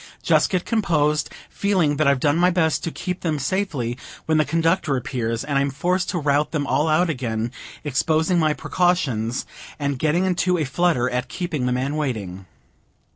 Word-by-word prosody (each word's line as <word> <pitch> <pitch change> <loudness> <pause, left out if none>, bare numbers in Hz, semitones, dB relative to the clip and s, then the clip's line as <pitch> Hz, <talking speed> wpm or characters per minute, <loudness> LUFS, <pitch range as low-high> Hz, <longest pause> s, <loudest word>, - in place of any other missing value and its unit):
Just - - +3
get 185 -2 -1
composed, 150 -9 +1 0.2
feeling 180 -8 +1
that 155 -1 +2
I've 140 -2 +3
done 145 +2 +2
my 175 +2 +4
best 165 -3 +1
to - - -1
keep 180 +2 -4
them 160 -3 -1
safely, 140 - -2 0.3
when 160 -1 +2
the 155 - +3
Conductor 165 -1 +1
appears, 120 -4 -2
and 140 0 0
I'm 140 0 +1
forced 180 +7 -1
to 180 - -1
rout 145 -1 +1
them 150 -3 -2
all 150 +3 +1
out 160 +3 +3
again, 120 -6 -2 0.3
exposing 160 +4 +1
my 155 -2 +2
precautions, 135 -11 0 0.3
and 140 -3 -2
getting 160 +5 +2
into 180 0 +1
a 160 - 0
flutter 145 -3 +1
at 125 +1 -2
keeping 160 -8 -2
the - - +1
man 130 +4 -1
waiting. 100 -11 -3
150 Hz, 180 wpm, -22 LUFS, 130-175 Hz, 0.3 s, my